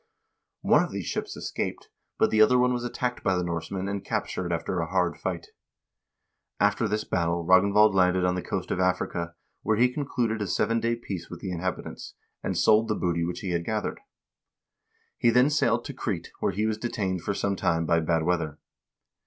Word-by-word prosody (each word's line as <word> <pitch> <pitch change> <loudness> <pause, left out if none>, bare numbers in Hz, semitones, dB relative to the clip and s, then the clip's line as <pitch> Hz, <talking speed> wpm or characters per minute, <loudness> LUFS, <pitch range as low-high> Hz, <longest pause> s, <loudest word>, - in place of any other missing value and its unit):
One - - +5
of - - -2
these - - -4
ships - - -3
escaped, - - -4 0.3
but - - +3
the 110 - +4
other 125 +4 +6
one 125 0 +3
was 120 -1 -2
attacked 125 0 -3
by 95 - +2
the 90 - 0
Norse 85 -2 -3
men 95 0 -3
and 100 0 -3
captured 90 -2 -2
after 85 +2 -1
a 80 - -1
hard 90 -1 +1
fight. - - -4 1.1
After 105 +3 +2
this 105 +1 -1
battle 85 -1 -1
Ragnvald 100 +3 +5
landed 90 -1 +3
on 90 - +2
the 90 - -2
coast - - -4
of - - -1
Africa, 90 -2 -1 0.3
where 110 0 +1
he 125 +2 +3
concluded 120 -6 -1
a 105 - -1
seven 115 +4 +1
day 115 +1 0
peace 95 -7 -6
with - - -8
the 95 - -5
inhabitants, 90 +1 -5 0.3
and - - -2
sold 110 +1 +4
the 110 - 0
booty 85 -3 0
which 85 +1 -3
he 95 - -3
had 85 -1 0
gathered. 110 +3 -2 1.2
He 120 - +4
then 125 +5 +4
sailed 120 -5 +2
to - - -5
Crete, - - -4
where - - +1
he 105 +4 -1
was 110 -1 -1
detained 100 -6 -2
for 100 +4 -2
some 100 0 0
time 85 -3 0
by 85 +1 +3
bad 80 0 +1
weather. 80 -3 -1
95 Hz, 200 wpm, -27 LUFS, 85-110 Hz, 1.2 s, other